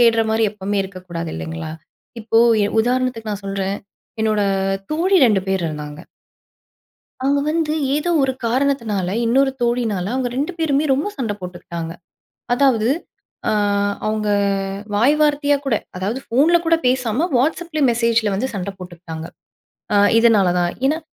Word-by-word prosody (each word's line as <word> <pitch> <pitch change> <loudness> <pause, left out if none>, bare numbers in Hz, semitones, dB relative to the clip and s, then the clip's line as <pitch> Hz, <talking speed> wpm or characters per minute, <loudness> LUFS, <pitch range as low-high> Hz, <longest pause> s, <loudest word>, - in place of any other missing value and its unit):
தேடுறமாரி 225 -1 +3
எப்பவுமே 205 0 -2
இருக்கக்கூடாது 180 -3 -6
இல்லேங்களா! 80 - -5 0.5
இப்போ 225 +1 +2 0.3
எ - - +2
உதாரணத்துக்கு 245 -2 -1
நான் 200 -1 -6
சொல்றேன், 195 0 -2 0.5
என்னோட 215 -1 +2 0.5
தோழி 360 +5 +2
2 210 -4 +3
பேர் 190 -2 0
இருந்தாங்க. 150 0 -7 1.2
அவங்க 275 +2 +1
வந்து, 315 -1 0 0.2
ஏதோ 300 +4 -1
ஒரு 265 -1 +1
காரணத்தினால 230 -7 0 0.2
இன்னொரு 270 +4 +3
தோழியினால 225 -5 0
அவங்க 255 -1 -1
2 295 +6 -1
பேருமே 305 -2 +1
ரொம்ப 285 +9 -1
சண்ட 230 -6 -2
போட்டுக்கிட்டாங்க. 170 -2 -6 0.6
அதாவது, 245 -4 +3 0.6
அ - - +2 0.6
அவங்க 215 -1 -1 0.7
வாய் 250 +8 +4
வார்த்தையா 290 -1 +3
கூட. 260 -5 +2 0.2
அதாவது 205 +7 -2
போன்ல 300 +8 +5
கூட 330 0 +4
பேசாம 250 +4 +1
வாட்ஸ்சப்ல 315 +3 -1
மெசேஜில 230 -3 +1
வந்து 220 +7 -1
சண்டை 195 0 -3
போட்டுக்கிட்டாங்க. 175 -3 -8 0.7
அ - - +4 0.2
இதனால 225 -5 +4
தான். 175 0 0
ஏன்னா, 305 +3 +1
225 Hz, 130 wpm, -20 LUFS, 195-270 Hz, 1.2 s, போன்ல